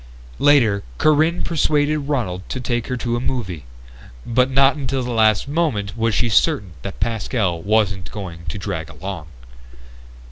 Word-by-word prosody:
Later, 120 Hz, -9 st, +4 dB, 0.2 s
Corinne 155 Hz, +3 st, +3 dB
persuaded 150 Hz, -2 st, +1 dB
Ronald 110 Hz, -11 st, -1 dB
to 130 Hz, -, -3 dB
take 120 Hz, -2 st, -2 dB
her 125 Hz, -, -2 dB
to 120 Hz, -1 st, -1 dB
a -, -, -1 dB
movie, 95 Hz, -, -3 dB, 0.6 s
but 125 Hz, +2 st, +2 dB
not 135 Hz, +1 st, +4 dB
until 135 Hz, -2 st, -2 dB
the 125 Hz, -, -3 dB
last 110 Hz, 0 st, +3 dB
moment 140 Hz, -10 st, -1 dB
was 115 Hz, -2 st, 0 dB
she -, -, +2 dB
certain 115 Hz, -, +2 dB
that -, -, -7 dB
Pascal 105 Hz, -5 st, -1 dB
wasn't 100 Hz, -2 st, +1 dB
going 90 Hz, -5 st, -7 dB
to 75 Hz, -, -4 dB
drag 80 Hz, -4 st, -4 dB
along. 90 Hz, -2 st, -7 dB
115 Hz, 150 wpm, -21 LUFS, 100-135 Hz, 0.6 s, Later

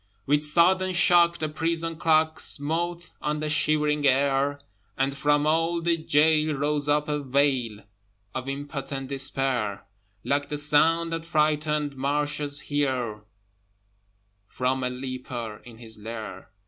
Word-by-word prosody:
With 145 Hz, +1 st, +2 dB
sudden 185 Hz, +4 st, +3 dB
shock 170 Hz, -1 st, +5 dB
the 155 Hz, -, -2 dB
prison 165 Hz, +2 st, -1 dB
clock 160 Hz, -1 st, +2 dB
Smote 170 Hz, +4 st, 0 dB
on 150 Hz, 0 st, -2 dB
the 155 Hz, 0 st, -2 dB
shivering 150 Hz, -1 st, +2 dB
air, 140 Hz, +1 st, +2 dB, 0.4 s
And 135 Hz, +1 st, 0 dB
from 145 Hz, +1 st, +2 dB
all 165 Hz, +2 st, +1 dB
the 170 Hz, 0 st, +1 dB
gaol 155 Hz, -1 st, +2 dB
rose 145 Hz, +1 st, 0 dB
up 150 Hz, 0 st, +2 dB
a 150 Hz, -1 st, -1 dB
wail 130 Hz, -5 st, 0 dB, 0.5 s
Of 130 Hz, +1 st, -4 dB
impotent 135 Hz, -1 st, -5 dB
despair, 135 Hz, -6 st, 0 dB, 0.4 s
Like 145 Hz, 0 st, -1 dB
the 150 Hz, -, -2 dB
sound 160 Hz, +3 st, +2 dB
that 165 Hz, 0 st, -3 dB
frightened 150 Hz, -2 st, 0 dB
marshes 145 Hz, +1 st, -1 dB
hear 125 Hz, -7 st, -2 dB, 1.2 s
From 130 Hz, +3 st, -1 dB
a 125 Hz, -, 0 dB
leper 125 Hz, -3 st, -6 dB
in 120 Hz, -2 st, -12 dB
his 110 Hz, -2 st, -9 dB
lair. 105 Hz, -4 st, -8 dB
145 Hz, 130 wpm, -25 LUFS, 135-155 Hz, 1.2 s, shock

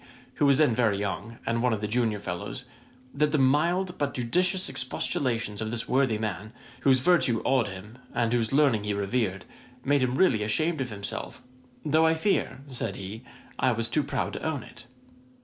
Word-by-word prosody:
who 145 Hz, -, +6 dB
was 140 Hz, -1 st, +5 dB
then 150 Hz, -6 st, +4 dB
very 110 Hz, -4 st, +2 dB
young, 105 Hz, +2 st, -4 dB
and 115 Hz, 0 st, 0 dB
one 125 Hz, -1 st, +2 dB
of 110 Hz, -, -1 dB
the 105 Hz, -, -2 dB
junior 110 Hz, -2 st, 0 dB
fellows; 100 Hz, +6 st, -5 dB, 0.5 s
that 150 Hz, +1 st, +1 dB
the 155 Hz, -, +2 dB
mild 170 Hz, +7 st, +2 dB
but 145 Hz, -2 st, -1 dB
judicious 180 Hz, +10 st, +1 dB
expostulations 125 Hz, -4 st, -2 dB
of 110 Hz, -, -2 dB
this 115 Hz, +1 st, -4 dB
worthy 130 Hz, -4 st, +2 dB
man, 105 Hz, 0 st, -4 dB, 0.3 s
whose 130 Hz, -1 st, +3 dB
virtue 130 Hz, -8 st, +3 dB
awed 130 Hz, -4 st, +3 dB
him, 105 Hz, +6 st, -9 dB
and 115 Hz, -1 st, 0 dB
whose 115 Hz, -2 st, +1 dB
learning 135 Hz, -7 st, +3 dB
he 105 Hz, -1 st, -1 dB
revered, 100 Hz, -2 st, -1 dB, 0.4 s
made 140 Hz, 0 st, +3 dB
him 130 Hz, 0 st, +1 dB
really 135 Hz, -, +3 dB
ashamed 155 Hz, +9 st, 0 dB
of 125 Hz, -, -2 dB
himself, 105 Hz, +4 st, -6 dB, 0.4 s
"though 160 Hz, +2 st, +4 dB
I 160 Hz, -, +3 dB
fear 160 Hz, -5 st, 0 dB
(said 115 Hz, -5 st, -3 dB
he) 100 Hz, +4 st, -7 dB, 0.4 s
I 130 Hz, -2 st, +3 dB
was 115 Hz, 0 st, -1 dB
too 155 Hz, -, +2 dB
proud -, -, -2 dB
to -, -, -6 dB
own 150 Hz, -7 st, -2 dB
it." 120 Hz, -, -14 dB
120 Hz, 185 wpm, -27 LUFS, 110-140 Hz, 0.5 s, who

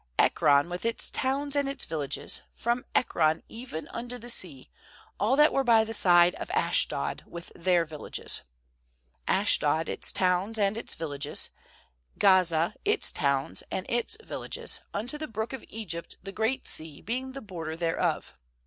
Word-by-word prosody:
^Ekron, 145 Hz, +1 st, +4 dB
with 175 Hz, +1 st, -5 dB
its 230 Hz, 0 st, +1 dB
towns 280 Hz, +2 st, -1 dB
and 285 Hz, -1 st, +1 dB
its 275 Hz, -1 st, -1 dB
vil 160 Hz, -, -3 dB
lages; 140 Hz, -2 st, -2 dB, 0.2 s
4efrom 240 Hz, +1 st, 0 dB
Ekron 160 Hz, -8 st, +2 dB
even 225 Hz, -9 st, -6 dB
unto 245 Hz, +1 st, -5 dB
the 240 Hz, 0 st, -3 dB
sea, 150 Hz, -, -4 dB, 0.5 s
all 220 Hz, +6 st, +3 dB
that 300 Hz, +2 st, +5 dB
were 270 Hz, -, +2 dB
by 230 Hz, -3 st, +5 dB
the 225 Hz, 0 st, -5 dB
side 175 Hz, -3 st, +6 dB
of -, -, -5 dB
Ashdod, 450 Hz, -, +1 dB
with 170 Hz, 0 st, -9 dB
their 175 Hz, -1 st, +2 dB
villages. 155 Hz, -1 st, -1 dB, 0.9 s
47Ashdod, 160 Hz, +1 st, +3 dB
its -, -, -1 dB
towns 185 Hz, +4 st, +1 dB
and 200 Hz, -1 st, +2 dB
its 230 Hz, -, -3 dB
villages; 145 Hz, -2 st, -2 dB, 0.7 s
Gaza, 175 Hz, -4 st, +4 dB
its 420 Hz, +1 st, +4 dB
towns 140 Hz, -2 st, 0 dB
and 190 Hz, -, -3 dB
its 240 Hz, -, -1 dB
villages; -, -, -4 dB
unto 245 Hz, +9 st, -3 dB
the 310 Hz, -, -4 dB
Brook 220 Hz, +3 st, -4 dB
of 265 Hz, -, -6 dB
Egypt, 170 Hz, -7 st, -5 dB
the 195 Hz, -, -6 dB
Great 220 Hz, +6 st, -1 dB
Sea 155 Hz, -2 st, 0 dB
being 255 Hz, +7 st, -4 dB
the 275 Hz, -, -7 dB
border 165 Hz, -6 st, -6 dB
thereof. 165 Hz, -1 st, -1 dB
200 Hz, 160 wpm, -28 LUFS, 165-240 Hz, 0.9 s, side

